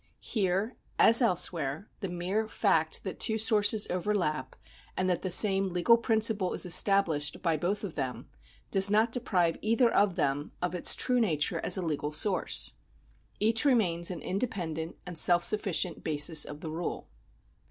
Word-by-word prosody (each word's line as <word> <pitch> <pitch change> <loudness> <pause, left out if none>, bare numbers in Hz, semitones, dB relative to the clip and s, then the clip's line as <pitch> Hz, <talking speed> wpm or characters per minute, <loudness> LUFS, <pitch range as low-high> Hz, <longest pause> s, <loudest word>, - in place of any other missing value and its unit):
Here, 200 +1 -3 0.2
as 230 +3 +7
else 185 -7 +4
where, 155 +4 -5
the 195 - -5
mere 185 +5 -3
fact 160 -8 -1
that 190 - -7
two 220 - +1
sources 215 -1 +3
overlap, 180 -4 -3 0.4
and 185 - -1
that 180 -2 -1
the 185 - -4
same 195 +1 +3
legal 180 +6 +3
principle 220 -4 0
is - - +1
established 180 -4 +2
by 165 -3 0
both 180 +7 -3
of 190 -5 -6
them, 130 -3 -6 0.4
does 195 0 +4
not 220 +3 +1
deprive 185 -9 -1
either 230 +2 +1
of 200 -3 +1
them 145 -3 -3
of 180 0 -3
its 180 - +5
true 250 -1 +1
nature 165 -5 -1
as 180 - +1
a 185 - -4
legal 150 -2 -4
source. 190 +4 +1 0.7
Each 225 +2 +2
remains 185 -11 +1
an 175 -4 -7
independent 175 -6 -5
and 175 -3 -4
self 175 +1 +4
sufficient 195 -4 -1
basis 155 0 +1
of 150 +1 -10
the 160 - -7
rule. 165 +2 -6
185 Hz, 165 wpm, -28 LUFS, 165-215 Hz, 0.7 s, as